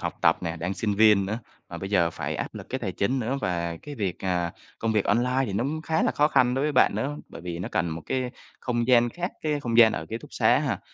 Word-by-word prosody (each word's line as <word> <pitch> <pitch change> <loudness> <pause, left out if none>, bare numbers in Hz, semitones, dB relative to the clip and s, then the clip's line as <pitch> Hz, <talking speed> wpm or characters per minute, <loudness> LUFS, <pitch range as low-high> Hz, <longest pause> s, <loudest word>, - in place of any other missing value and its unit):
học - - -3
tập - - +4
nè, 85 0 -3
đang 90 +4 -3
sinh 105 -1 -1
viên 105 -2 +5
nữa, 105 +3 -2 0.3
mà 85 - -7
bây 95 +3 -6
giờ 85 -4 +3
phải - - -4
áp - - -4
lực - - -8
cái 130 - -1
tài 95 -7 -3
chính 130 +9 0
nữa. 130 +4 -1
Và 85 -2 -2
cái 145 -1 -7
việc, 100 -7 -3
à 90 -2 0 0.3
công 115 -1 0
việc 105 -2 +2
online 125 +5 +2
thì 100 - -4
nó 110 +6 0
cũng 155 +3 -3
khá 160 0 0
là - - +2
khó 150 +1 +3
khăn 125 -3 +3
đối 135 - 0
với 150 - 0
bạn - - +4
nữa, 145 +2 -2
bởi - - -10
vì 85 -1 -5
nó 90 - -4
cần 85 0 +1
một 80 0 -5
cái 130 -1 -1 0.3
không 120 -2 -1
gian 120 -1 +5
khác, 175 +1 -4
cái 150 -2 0
không 120 -3 0
gian 110 -2 +8
ở 80 - -4
ký 115 - -3
túc - - -14
xá - - +4
ha, - - -1
110 Hz, 285 wpm, -26 LUFS, 90-130 Hz, 0.3 s, gian